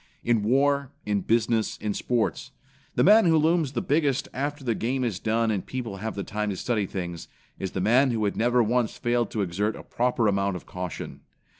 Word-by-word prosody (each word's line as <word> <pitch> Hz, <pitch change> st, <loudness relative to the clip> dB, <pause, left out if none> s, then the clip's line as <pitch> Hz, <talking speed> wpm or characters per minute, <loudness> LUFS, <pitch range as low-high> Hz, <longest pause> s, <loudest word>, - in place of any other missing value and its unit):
In 115 Hz, -2 st, +2 dB
war, 140 Hz, +4 st, +2 dB, 0.2 s
in 105 Hz, -1 st, 0 dB
business, 115 Hz, 0 st, +1 dB
in 105 Hz, -1 st, -2 dB
sports, 120 Hz, 0 st, -1 dB, 0.5 s
the -, -, +3 dB
man 215 Hz, +2 st, +7 dB
who 165 Hz, -2 st, +5 dB
looms 155 Hz, -2 st, +2 dB
the 120 Hz, -, -2 dB
biggest 145 Hz, -3 st, +1 dB
after 145 Hz, +1 st, -3 dB
the 120 Hz, -3 st, +1 dB
game 125 Hz, +4 st, -1 dB
is 110 Hz, -7 st, -2 dB
done 115 Hz, 0 st, +1 dB
and 100 Hz, -3 st, -1 dB
people 120 Hz, -6 st, -5 dB
have 110 Hz, +3 st, -4 dB
the 100 Hz, -, -3 dB
time 105 Hz, 0 st, -3 dB
to 95 Hz, -, -3 dB
study 110 Hz, -3 st, -1 dB
things, 85 Hz, -3 st, -5 dB, 0.3 s
is 95 Hz, -, -4 dB
the 95 Hz, -, -2 dB
man 125 Hz, +7 st, +4 dB
who 110 Hz, -3 st, 0 dB
had 100 Hz, -, -1 dB
never 120 Hz, +1 st, +3 dB
once 120 Hz, 0 st, 0 dB
failed 120 Hz, -2 st, 0 dB
to 105 Hz, -, -1 dB
exercise 100 Hz, +4 st, -2 dB
a -, -, -10 dB
proper 120 Hz, -2 st, 0 dB
amount 100 Hz, -1 st, +1 dB
of 90 Hz, -, -8 dB
caution. 90 Hz, -2 st, -6 dB
115 Hz, 205 wpm, -26 LUFS, 105-130 Hz, 0.5 s, man